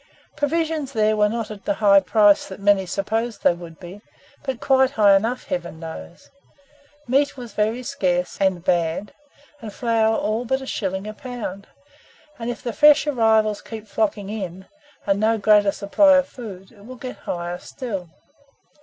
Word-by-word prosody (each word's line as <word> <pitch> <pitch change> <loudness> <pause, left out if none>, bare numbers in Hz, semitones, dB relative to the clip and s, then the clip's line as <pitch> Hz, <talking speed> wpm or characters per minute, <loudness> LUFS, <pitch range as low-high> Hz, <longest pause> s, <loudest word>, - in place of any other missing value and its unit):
Provisions 310 -2 -1
there 215 -1 +2
were 210 0 +3
not 225 -1 -4
at 205 -2 -10
the 200 - 0
high 200 -2 +5
price 205 +1 +4
that 190 - -9
many 200 -1 +3
supposed 220 +5 -2
they - - +5
would 170 -2 -11
be, 185 +3 -10 0.4
but 265 -4 -4
quite 265 -1 +3
high 210 -6 +5
enough, 230 +6 0
Heaven 170 -2 -4
knows! 165 +1 -10 0.8
Meat 275 +3 +1
was 240 -4 -9
very 220 +4 -1
scarce 185 -10 -1
and 190 -3 +1
bad, 175 +1 0 0.5
and 220 -2 -7
flour 225 -1 +1
all 220 +3 -1
but 265 +2 -1
a 265 - -8
shilling 190 -5 -3
a 215 - -6
pound; 215 -5 -7 0.7
and 230 +1 -4
if 240 - -6
the 235 - -3
fresh 295 +4 +6
arrivals 220 -6 +2
keep 220 -1 -9
flocking 205 -1 -1
in, 190 -3 -6 0.4
and 200 0 +1
no 220 +1 +2
greater 205 -1 +4
supply 280 +10 +4
of 275 0 +1
food, 195 -8 -10
it 205 -3 -18
will 255 +4 -10
get 250 +1 -8
higher 175 0 -5
still. 195 -9 -6
215 Hz, 170 wpm, -22 LUFS, 195-240 Hz, 0.8 s, fresh